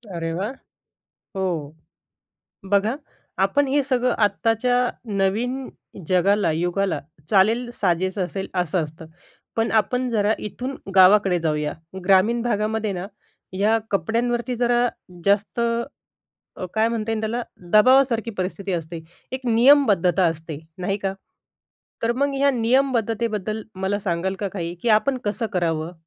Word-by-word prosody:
अरे 165 -1 -3
वा! 190 +5 -2 0.9
हो. 165 -6 -2 1.0
बघा, 205 +4 +2 0.4
आपण 195 +10 +2
हे 285 +2 +2
सगळं 255 -2 +1
आत्ताच्या 225 +4 +1 0.4
नवीन 230 +7 0 0.4
जगाला, 190 +1 +3
युगाला 175 +4 -1 0.3
चालेल, 220 +5 +3
साजेसं 185 +1 0
असेल 190 +2 -5
असं 180 -1 0
असतं. 160 +2 -11 0.5
पण 225 0 +1
आपण 250 +3 +1
जरा 210 -2 +2
इथून 255 +6 -5 0.2
गावाकडे 190 -1 +6
जाऊया. 150 -2 -1 0.3
ग्रामीण 200 +5 +4
भागामध्ये 220 -2 -1
ना, 180 0 -5 0.5
ह्या 210 +4 +2
कपड्यांवरती 240 +6 0
जरा 240 0 +2 0.4
जास्त 200 +3 +1 1.0
अ, - - -5
काय 220 +1 +3
म्हणता 225 -1 -2
येईल 220 -1 -1
त्याला, 225 +3 -2 0.3
दबावासारखी 240 +1 +4
परिस्थिती 195 -1 -4
असते, 165 -1 -4 0.3
एक 260 - -3
नियमबद्धता 225 - +4
असते, 160 -2 -2 0.2
नाही 190 +2 -1
का? 195 -1 -2 0.9
तर 230 +1 +2
मग 280 +2 0
ह्या 280 +1 +3
नियमबद्धतेबद्दल 230 -4 0 0.2
मला 200 +2 0
सांगाल 190 -1 -2
का 200 - -1
काही, 175 -2 -5
की - - 0
आपण 240 +5 +3
कसं 215 +3 -1
करावं? 165 -2 -1
210 Hz, 125 wpm, -23 LUFS, 185-235 Hz, 1.0 s, गावाकडे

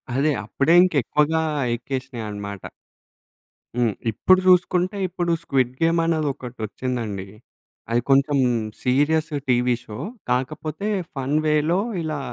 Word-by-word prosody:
అదే. 150 +3 +2
అప్పుడే 140 +8 +2
ఇంక 185 - +1
ఎక్కువగా 155 +5 +1 0.3
ఎక్కేసినాయి 130 -2 -5
అన్నమాట. 100 -2 -6 1.2
హ్మ్. 115 -4 +2 0.2
ఇప్పుడు 185 - +4
చూసుకుంటే 180 +2 +3
ఇప్పుడు 175 -1 -2
స్క్విడ్‌గేమ్ 135 +5 +1
అనేదొకటొచ్చిందండి. 125 - -3 0.6
అది 120 +1 +2
కొంచెం 140 +1 +4 0.5
సీరియస్ 150 +5 +2 0.2
టీవీ 125 0 +3
షో 105 -4 -9 0.3
కాకపోతే 155 +8 -2 0.3
ఫన్ 135 +2 -1
వేలో 155 +4 +2 0.2
ఇలా 155 -2 -3
140 Hz, 100 wpm, -23 LUFS, 125-160 Hz, 1.2 s, ఇప్పుడు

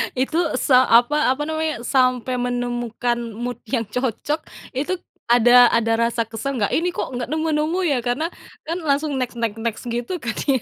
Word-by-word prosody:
Itu 265 +6 0 0.2
sa 255 -2 +5
apa 255 +4 +4
apa 285 - -7
namanya 315 -4 -2
sampai 255 0 +1
menemukan 245 -1 -2 0.2
mood 240 +3 -4
yang 230 +1 -1
cocok 260 +6 -2 0.2
itu 275 +7 -2 0.3
ada 245 +1 +7
ada 225 0 +2
rasa 230 0 +1
kesel 225 +5 -4
nggak 205 - +2
ini 350 +2 0
kok - - -3
nggak 245 - -2
nemu-nemu 315 +2 0
ya? 280 - +2
Karena 275 +7 0 0.3
kan 335 +3 -4
langsung 285 0 0
next, 250 -1 -2
next, 225 -2 -1
next 225 -1 -3
gitu 240 +10 -3
kan 235 -2 -3
ya, 265 -4 +2
250 Hz, 170 wpm, -21 LUFS, 235-295 Hz, 0.3 s, ada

